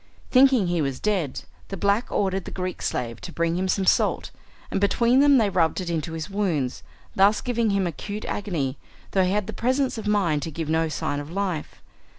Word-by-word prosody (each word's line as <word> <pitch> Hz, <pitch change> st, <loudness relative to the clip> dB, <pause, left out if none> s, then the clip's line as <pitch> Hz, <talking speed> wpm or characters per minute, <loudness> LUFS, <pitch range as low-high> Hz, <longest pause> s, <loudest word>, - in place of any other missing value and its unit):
Thinking 260 Hz, -5 st, +5 dB
he 175 Hz, -2 st, 0 dB
was 135 Hz, -3 st, -2 dB
dead, 185 Hz, -11 st, -1 dB, 0.3 s
the 195 Hz, -, -6 dB
black 200 Hz, +5 st, +1 dB
ordered 190 Hz, -2 st, 0 dB
the -, -, -6 dB
Greek 185 Hz, -1 st, -4 dB
slave 115 Hz, -2 st, -3 dB
to 180 Hz, -, -7 dB
bring 170 Hz, 0 st, 0 dB
him 185 Hz, +1 st, -1 dB
some 190 Hz, +1 st, 0 dB
salt, -, -, +2 dB, 0.4 s
and 195 Hz, -, -1 dB
between 235 Hz, +5 st, +3 dB
them 285 Hz, -1 st, +6 dB
they 220 Hz, -4 st, +3 dB
rubbed 165 Hz, -2 st, +1 dB
it 180 Hz, -2 st, -3 dB
into 160 Hz, -1 st, -3 dB
his 160 Hz, 0 st, -4 dB
wounds, 180 Hz, -11 st, -1 dB, 0.3 s
thus 200 Hz, +2 st, +4 dB
giving 235 Hz, -3 st, 0 dB
him 200 Hz, -2 st, +1 dB
acute 205 Hz, +6 st, -5 dB
agony, 155 Hz, -10 st, -3 dB, 0.3 s
though 190 Hz, -, +3 dB
he 185 Hz, -, +1 dB
had 210 Hz, 0 st, 0 dB
the -, -, -6 dB
presence 255 Hz, 0 st, 0 dB
of 215 Hz, -, -5 dB
mind 185 Hz, -8 st, +2 dB
to 165 Hz, -, -4 dB
give 160 Hz, 0 st, -5 dB
no 160 Hz, 0 st, +1 dB
sign 145 Hz, -1 st, -2 dB
of 145 Hz, +1 st, -7 dB
life. 185 Hz, -4 st, -3 dB
190 Hz, 205 wpm, -24 LUFS, 160-210 Hz, 0.4 s, them